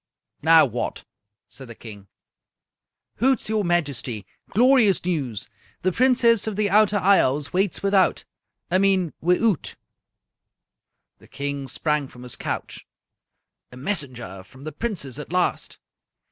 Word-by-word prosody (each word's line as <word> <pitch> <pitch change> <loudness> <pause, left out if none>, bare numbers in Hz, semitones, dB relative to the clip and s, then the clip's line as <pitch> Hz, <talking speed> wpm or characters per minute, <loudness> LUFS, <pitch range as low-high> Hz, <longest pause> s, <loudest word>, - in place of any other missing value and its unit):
"Now 160 +1 +6
what?" 120 -2 -4 0.4
said 135 - -11
the 115 - -10
King. 105 -4 -11 1.1
"Hoots, 260 0 +1
your 215 -1 0
Majesty! 140 - -1 0.2
Glorious 235 -5 +4
news! 140 - -3 0.4
The 185 - +2
Princess 235 -1 +3
of 215 - -2
the 205 -1 0
Outer 210 0 +4
Isles 150 -7 +2
waits 195 +1 0
without 195 -1 +2 0.5
I 185 - +3
mean 190 -4 +2
wi'oot!" 180 +2 +1 1.4
The - - -19
King 140 -1 -5
sprang 150 0 -1
from 125 -1 -14
his 125 - -7
couch. - - -5 0.8
"A 125 - -12
messenger 130 - -3
from 130 +8 -16
the 155 - -5
Princess 150 - -5
at 150 - -8
last!" 180 0 -1
175 Hz, 125 wpm, -23 LUFS, 135-205 Hz, 1.4 s, Now